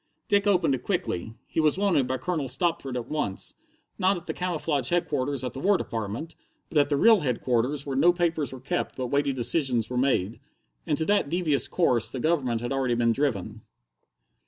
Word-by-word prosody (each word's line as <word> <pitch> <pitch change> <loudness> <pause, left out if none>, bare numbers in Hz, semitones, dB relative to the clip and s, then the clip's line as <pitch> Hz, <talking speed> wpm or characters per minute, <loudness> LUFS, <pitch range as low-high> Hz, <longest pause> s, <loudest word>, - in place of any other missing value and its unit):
Dick 205 0 +2
opened 180 -7 +3
it 130 - -2
quickly. 115 - -3
He - - -3
was 155 +1 +3
wanted 190 -10 +2
by 130 +1 -1
Colonel 150 -1 -2
Stopford 135 -2 -1
at 120 -1 -5
once, 150 -11 -3 0.5
not 190 0 +3
at 170 - -10
the - - -3
camouflaged 155 -7 -1
Headquarters 145 -6 0
at 125 - -4
the 135 - -6
War 200 +6 +3
Department, 115 - -5 0.4
but 155 - +2
at 145 0 +3
the 145 - +1
real 225 +6 +6
Headquarters 130 0 -1
where 140 -2 -3
no 165 +6 +5
papers 165 -6 -1
were 130 - -8
kept 130 - -3
but 125 -2 -4
weighty 140 0 +2
decisions 125 -2 +1
were 125 - -2
made. 125 -5 +1 0.5
And 150 - +1
to 160 - -1
that 205 -7 +2
devious 160 -4 +1
course 125 -10 +1
the 130 - -5
Government 130 -6 0
had 120 - -4
already 130 -3 0
been 115 -1 +2
driven. 110 -5 -2
140 Hz, 195 wpm, -26 LUFS, 125-165 Hz, 0.5 s, real